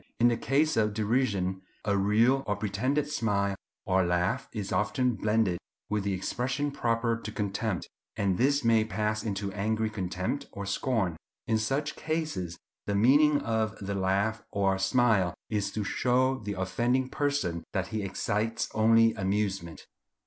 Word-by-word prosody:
In 120 Hz, +1 st, +6 dB
the 120 Hz, -, +1 dB
case 150 Hz, +6 st, +1 dB
of 105 Hz, -1 st, +2 dB
derision, 105 Hz, -5 st, 0 dB, 0.2 s
a 100 Hz, -1 st, +2 dB
real 110 Hz, +7 st, +3 dB
or 105 Hz, -, +1 dB
pretended 115 Hz, +9 st, 0 dB
smile 100 Hz, -8 st, 0 dB, 0.3 s
or 95 Hz, 0 st, +3 dB
laugh 90 Hz, +9 st, 0 dB
is 105 Hz, -3 st, -4 dB
often 125 Hz, +4 st, +1 dB
blended 105 Hz, -5 st, +1 dB, 0.3 s
with 105 Hz, -1 st, 0 dB
the 100 Hz, -, 0 dB
expression 125 Hz, +9 st, -2 dB
proper 115 Hz, -2 st, 0 dB
to 110 Hz, -1 st, -7 dB
contempt, 105 Hz, -2 st, -2 dB, 0.3 s
and 95 Hz, -3 st, 0 dB
this 140 Hz, +2 st, +3 dB
may 115 Hz, -1 st, +5 dB
pass 110 Hz, 0 st, -1 dB
into 100 Hz, -2 st, -3 dB
angry 110 Hz, +2 st, -1 dB
contempt 105 Hz, +7 st, -3 dB
or 100 Hz, -, -5 dB
scorn. 100 Hz, -4 st, 0 dB, 0.3 s
In 110 Hz, -1 st, +1 dB
such 135 Hz, +7 st, -1 dB
cases 155 Hz, -, -3 dB, 0.3 s
the 100 Hz, -, 0 dB
meaning 145 Hz, +7 st, +5 dB
of 110 Hz, -1 st, -1 dB
the 100 Hz, 0 st, -4 dB
laugh 100 Hz, +3 st, 0 dB
or 95 Hz, -1 st, +1 dB
smile 95 Hz, -3 st, +3 dB, 0.2 s
is 105 Hz, -2 st, 0 dB
to 105 Hz, -, -1 dB
show 130 Hz, +5 st, +1 dB
the 105 Hz, -2 st, -4 dB
offending 120 Hz, +8 st, +1 dB
person 140 Hz, -, -1 dB
that 95 Hz, -1 st, -1 dB
he 110 Hz, -1 st, -2 dB
excites 105 Hz, +3 st, -1 dB
only 115 Hz, +1 st, +5 dB
amusement. 95 Hz, -3 st, -2 dB
110 Hz, 150 wpm, -29 LUFS, 100-120 Hz, 0.3 s, In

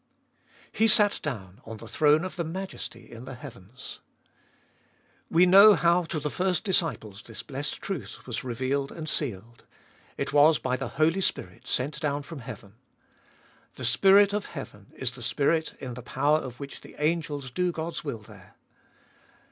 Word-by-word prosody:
He 225 Hz, -, +3 dB
sat 210 Hz, -1 st, +5 dB
down 105 Hz, -7 st, -6 dB
on 115 Hz, 0 st, -8 dB
the 115 Hz, -, -11 dB
throne 150 Hz, +5 st, +3 dB
of 185 Hz, -, -6 dB
the 170 Hz, -, -2 dB
Majesty 185 Hz, +4 st, -6 dB
in 115 Hz, +1 st, -9 dB
the 130 Hz, 0 st, -7 dB
heavens. 120 Hz, +1 st, -10 dB, 1.3 s
We 170 Hz, +2 st, +5 dB
know 200 Hz, +3 st, +9 dB
how 170 Hz, +1 st, +3 dB
to 160 Hz, -1 st, -3 dB
the 150 Hz, 0 st, -3 dB
first 185 Hz, -1 st, 0 dB
disciples 160 Hz, -, -1 dB
this 115 Hz, -3 st, -9 dB
blessed 140 Hz, +1 st, -4 dB
truth 150 Hz, -, -5 dB
was 120 Hz, -3 st, -4 dB
revealed 130 Hz, +3 st, -1 dB
and 160 Hz, -2 st, -7 dB
sealed 115 Hz, -6 st, -3 dB, 0.3 s
— -, -, -30 dB
it -, -, -3 dB
was 150 Hz, +1 st, +6 dB
by 130 Hz, -1 st, -1 dB
the 130 Hz, 0 st, -4 dB
Holy 165 Hz, +5 st, +3 dB
Spirit 90 Hz, -, -3 dB
sent 135 Hz, +4 st, -1 dB
down 145 Hz, -1 st, -1 dB
from 160 Hz, 0 st, -8 dB
heaven. 110 Hz, -5 st, -9 dB, 1.0 s
The 130 Hz, -, -4 dB
Spirit 195 Hz, -, +5 dB
of 210 Hz, 0 st, -1 dB
heaven 105 Hz, -9 st, -9 dB
is 130 Hz, -2 st, -2 dB
the 125 Hz, 0 st, -9 dB
Spirit 155 Hz, +6 st, 0 dB
in 125 Hz, -2 st, -6 dB
the 125 Hz, -, -8 dB
power 145 Hz, +5 st, +2 dB
of 125 Hz, -5 st, -8 dB
which 140 Hz, -1 st, -8 dB
the -, -, -14 dB
angels 150 Hz, -4 st, -1 dB
do 180 Hz, +6 st, 0 dB
God's 165 Hz, 0 st, -4 dB
will 140 Hz, -7 st, -4 dB
there. -, -, -16 dB
145 Hz, 170 wpm, -27 LUFS, 125-170 Hz, 1.3 s, know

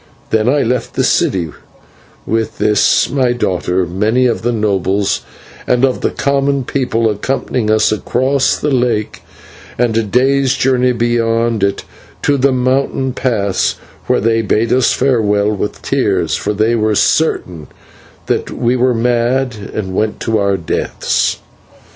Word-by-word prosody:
Then 110 Hz, +2 st, +2 dB
I 145 Hz, +1 st, +2 dB
left 125 Hz, 0 st, -2 dB
the -, -, +1 dB
city 85 Hz, -5 st, +1 dB, 0.7 s
with 110 Hz, -1 st, -2 dB
this 105 Hz, -1 st, +3 dB
my 130 Hz, -3 st, +1 dB
daughter, 90 Hz, -5 st, -1 dB
many 105 Hz, +8 st, +1 dB
of 120 Hz, -2 st, 0 dB
the 120 Hz, +2 st, 0 dB
nobles 100 Hz, -3 st, 0 dB, 0.5 s
and 125 Hz, +1 st, +3 dB
of 130 Hz, -, -2 dB
the -, -, +1 dB
common 140 Hz, -1 st, 0 dB
people 120 Hz, -3 st, 0 dB
accompanying 110 Hz, +1 st, -2 dB
us 110 Hz, 0 st, +3 dB
across 130 Hz, +5 st, 0 dB
the 150 Hz, -, -2 dB
lake 120 Hz, -5 st, -1 dB, 0.6 s
and 120 Hz, -2 st, +1 dB
a 115 Hz, -, +3 dB
day's 130 Hz, +5 st, +1 dB
journey 125 Hz, -1 st, +2 dB
beyond 115 Hz, -2 st, 0 dB
it 100 Hz, 0 st, 0 dB, 0.4 s
to 145 Hz, -1 st, +2 dB
the 135 Hz, +1 st, +2 dB
mountain 130 Hz, +1 st, 0 dB
pass, 105 Hz, -7 st, 0 dB, 0.3 s
where -, -, +2 dB
they 115 Hz, +1 st, +1 dB
bid 110 Hz, +1 st, +1 dB
us 130 Hz, -1 st, +3 dB
farewell 105 Hz, -6 st, +1 dB
with 105 Hz, 0 st, -4 dB
tears, 100 Hz, -, 0 dB
for 105 Hz, -, -2 dB
they 110 Hz, +3 st, +1 dB
were 110 Hz, -2 st, +1 dB
certain 90 Hz, -, 0 dB, 0.6 s
that -, -, -1 dB
we 120 Hz, 0 st, 0 dB
were 125 Hz, 0 st, +2 dB
mad 120 Hz, +2 st, 0 dB, 0.2 s
and 95 Hz, -3 st, -4 dB
went 105 Hz, +2 st, -1 dB
to 115 Hz, -2 st, 0 dB
our 100 Hz, -1 st, +1 dB
deaths. 85 Hz, -, -1 dB
115 Hz, 145 wpm, -15 LUFS, 105-130 Hz, 0.7 s, this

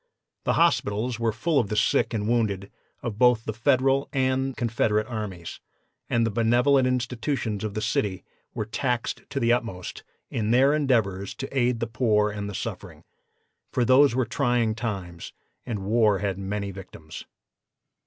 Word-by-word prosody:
The -, -, +2 dB
hospitals 110 Hz, +4 st, +1 dB
were 115 Hz, -1 st, +1 dB
full 140 Hz, +8 st, +1 dB
of 115 Hz, -, 0 dB
the 105 Hz, -, -2 dB
sick -, -, +2 dB
and 105 Hz, -2 st, -2 dB
wounded 105 Hz, -5 st, 0 dB, 0.3 s
of 110 Hz, -4 st, -4 dB
both 125 Hz, -3 st, +4 dB
the 110 Hz, -, -3 dB
Federal 135 Hz, +4 st, +2 dB
and 130 Hz, 0 st, 0 dB
Confederate 110 Hz, -2 st, +1 dB
armies, 105 Hz, -7 st, -6 dB, 0.5 s
and 115 Hz, -1 st, +2 dB
the 115 Hz, -, -1 dB
benevolent 125 Hz, +5 st, +3 dB
institutions 125 Hz, -3 st, -2 dB
of 105 Hz, -2 st, -4 dB
the 110 Hz, -, -2 dB
city 95 Hz, -3 st, -1 dB, 0.3 s
were 110 Hz, -, -2 dB
taxed 120 Hz, +2 st, -2 dB
to 140 Hz, -, -2 dB
the 120 Hz, -1 st, +3 dB
utmost 115 Hz, -7 st, -4 dB, 0.3 s
in 110 Hz, -2 st, -1 dB
their 130 Hz, +5 st, +5 dB
endeavors 110 Hz, -10 st, 0 dB
to 135 Hz, +1 st, -7 dB
aid 125 Hz, -2 st, +2 dB
the -, -, +1 dB
poor 110 Hz, -2 st, +1 dB
and 100 Hz, -1 st, -5 dB
the 100 Hz, -, -6 dB
suffering, -, -, -6 dB, 0.7 s
for 125 Hz, -, +1 dB
those 130 Hz, +1 st, +5 dB
were 130 Hz, -1 st, +1 dB
trying 120 Hz, -5 st, +1 dB
times, 95 Hz, -7 st, -5 dB, 0.3 s
and 105 Hz, -5 st, -3 dB
war 110 Hz, -1 st, +3 dB
has 100 Hz, 0 st, -2 dB
many 100 Hz, +1 st, -4 dB
victims. 85 Hz, -4 st, -10 dB
115 Hz, 160 wpm, -25 LUFS, 105-125 Hz, 0.7 s, their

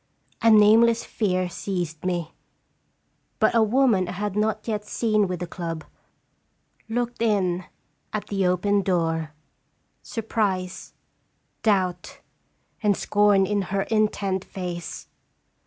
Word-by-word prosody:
A 230 Hz, -, +5 dB
nameless 225 Hz, +2 st, +6 dB
fear 185 Hz, -4 st, 0 dB
seized 175 Hz, -3 st, -4 dB
me. 175 Hz, -3 st, -2 dB, 1.0 s
But -, -, +3 dB
a 230 Hz, -, +4 dB
woman 220 Hz, -4 st, +3 dB
I 180 Hz, -, -4 dB
had 205 Hz, +1 st, -3 dB
not 215 Hz, +1 st, -1 dB
yet 210 Hz, -2 st, -2 dB
seen 215 Hz, -1 st, +1 dB
with 180 Hz, -1 st, -4 dB
the -, -, -1 dB
club 165 Hz, -2 st, -5 dB, 1.1 s
looked 240 Hz, +1 st, -2 dB
in 185 Hz, -5 st, +1 dB, 0.5 s
at 215 Hz, -, -3 dB
the 195 Hz, -2 st, 0 dB
open 200 Hz, +3 st, +2 dB
door, 165 Hz, -4 st, 0 dB, 0.7 s
sur 225 Hz, -, -5 dB
prise, 190 Hz, -5 st, -2 dB, 0.7 s
doubt, 190 Hz, -5 st, 0 dB, 0.6 s
and 205 Hz, -3 st, +2 dB
scorn 205 Hz, -2 st, +3 dB
in 205 Hz, 0 st, 0 dB
her 195 Hz, 0 st, 0 dB
intent 205 Hz, -3 st, 0 dB
face. 175 Hz, -3 st, -6 dB
200 Hz, 120 wpm, -24 LUFS, 180-215 Hz, 1.1 s, nameless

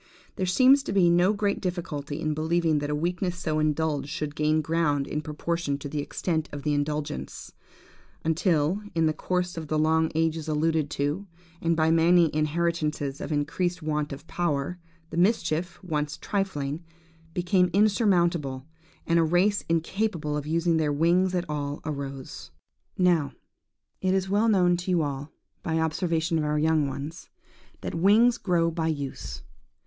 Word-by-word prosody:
There 185 Hz, -, -1 dB
seems 260 Hz, +9 st, +6 dB
to -, -, -5 dB
me 195 Hz, -, +4 dB
to -, -, +4 dB
be 175 Hz, -, +6 dB
no 175 Hz, +3 st, +4 dB
great 205 Hz, -1 st, -1 dB
difficulty 155 Hz, -5 st, -4 dB
in 155 Hz, -2 st, -1 dB
believing 160 Hz, 0 st, +1 dB
that 145 Hz, 0 st, -3 dB
a 150 Hz, -, 0 dB
weakness 175 Hz, +3 st, -1 dB
so 155 Hz, -3 st, -1 dB
indulged 155 Hz, -1 st, 0 dB
should 150 Hz, 0 st, -3 dB
gain 155 Hz, +1 st, +2 dB
ground 150 Hz, -3 st, +1 dB
in 150 Hz, +1 st, -3 dB
proportion 155 Hz, -1 st, -2 dB
to 140 Hz, -, -7 dB
the 150 Hz, +1 st, -3 dB
extent 160 Hz, +2 st, -2 dB
of 145 Hz, -1 st, -7 dB
the 150 Hz, -, +1 dB
indulgence, 145 Hz, -, -3 dB, 0.7 s
until, 165 Hz, +2 st, +1 dB
in 165 Hz, -1 st, +3 dB
the 155 Hz, -, +2 dB
course 180 Hz, +1 st, -2 dB
of 160 Hz, -1 st, -5 dB
the 155 Hz, -, 0 dB
long 160 Hz, +1 st, +2 dB
ages 160 Hz, -1 st, 0 dB
alluded 155 Hz, -1 st, +1 dB
to, 150 Hz, +7 st, -2 dB, 0.3 s
and 165 Hz, 0 st, +2 dB
by 160 Hz, 0 st, +3 dB
many 165 Hz, 0 st, +4 dB
inheritances 155 Hz, -2 st, -1 dB
of -, -, -5 dB
increased 165 Hz, +4 st, -1 dB
want 150 Hz, -1 st, -1 dB
of 140 Hz, +2 st, -8 dB
power, 170 Hz, 0 st, -2 dB, 0.3 s
the -, -, -5 dB
mischief, 175 Hz, -3 st, +1 dB
once 150 Hz, -3 st, -2 dB
trifling, 165 Hz, -6 st, -2 dB, 0.5 s
became 180 Hz, 0 st, +2 dB
insurmountable, 175 Hz, -, +2 dB, 0.4 s
and 170 Hz, 0 st, +3 dB
a -, -, +4 dB
race 180 Hz, +5 st, +2 dB
incapable 165 Hz, -2 st, -1 dB
of 150 Hz, 0 st, -3 dB
using 165 Hz, +1 st, +1 dB
their 155 Hz, -2 st, +1 dB
wings 175 Hz, +5 st, +2 dB
at 175 Hz, -1 st, -1 dB
all, 145 Hz, -1 st, -3 dB
arose. 140 Hz, -3 st, -6 dB, 0.5 s
"Now, 170 Hz, -7 st, +2 dB, 0.7 s
it 185 Hz, 0 st, +2 dB
is 190 Hz, 0 st, -1 dB
well 215 Hz, +3 st, +3 dB
known 180 Hz, -4 st, +4 dB
to 175 Hz, +2 st, -5 dB
you 175 Hz, -3 st, +3 dB
all, 145 Hz, +1 st, -4 dB, 0.3 s
by 165 Hz, -4 st, -1 dB
observation 160 Hz, +1 st, 0 dB
of -, -, 0 dB
our 150 Hz, 0 st, 0 dB
young 155 Hz, -1 st, +2 dB
ones, 140 Hz, +4 st, -7 dB, 0.5 s
that -, -, -4 dB
wings 215 Hz, +8 st, +4 dB
grow 170 Hz, -3 st, +1 dB
by 160 Hz, 0 st, -1 dB
use. 135 Hz, -, -4 dB
160 Hz, 165 wpm, -26 LUFS, 150-175 Hz, 0.7 s, seems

